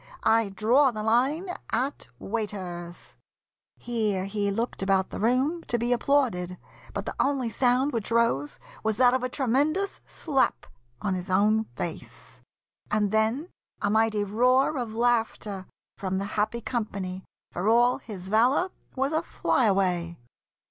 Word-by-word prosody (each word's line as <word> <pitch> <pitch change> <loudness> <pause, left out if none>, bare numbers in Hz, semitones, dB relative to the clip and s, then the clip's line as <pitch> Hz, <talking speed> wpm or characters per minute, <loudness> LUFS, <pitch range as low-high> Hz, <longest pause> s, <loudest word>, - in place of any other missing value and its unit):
I 225 -1 +3
draw 235 +8 +4
the 215 -3 -4
line 265 - +2 0.2
At 255 - -1
waiters." 185 - -5 0.6
Here 215 -5 -1
he 200 0 -1
looked 225 +3 -2
about 195 -1 +1
the - - -5
room 265 +9 +1
To 240 - 0
be 240 +1 +1
applauded; 230 -10 +1 0.3
but - - -4
the - - -4
only 270 -4 +1
sound 255 +5 +2
Which 225 -3 -2
rose 230 -12 +1 0.3
was 220 -1 0
that 250 0 +5
of 260 - +1
a 255 - -2
tremendous 290 - 0
slap 275 -5 0 0.4
On 200 - 0
his 185 +1 -4
own 210 +4 +3
face, - - -6 0.5
and 210 -1 +1
then 220 +10 +1 0.3
a 205 - 0
mighty 220 -1 +2
roar 250 +8 +3
Of 225 -3 -4
laughter 225 -5 0 0.3
from 190 -1 -2
the 195 - -2
happy 215 +3 0
company, 195 -6 -3 0.3
For 180 +4 -2
all 240 +2 +4
his 190 -4 -8
valour 250 - +3 0.2
was 270 +3 0
a 315 - +2
fly 255 - +1
away. 180 -4 +1
225 Hz, 145 wpm, -27 LUFS, 200-255 Hz, 0.6 s, that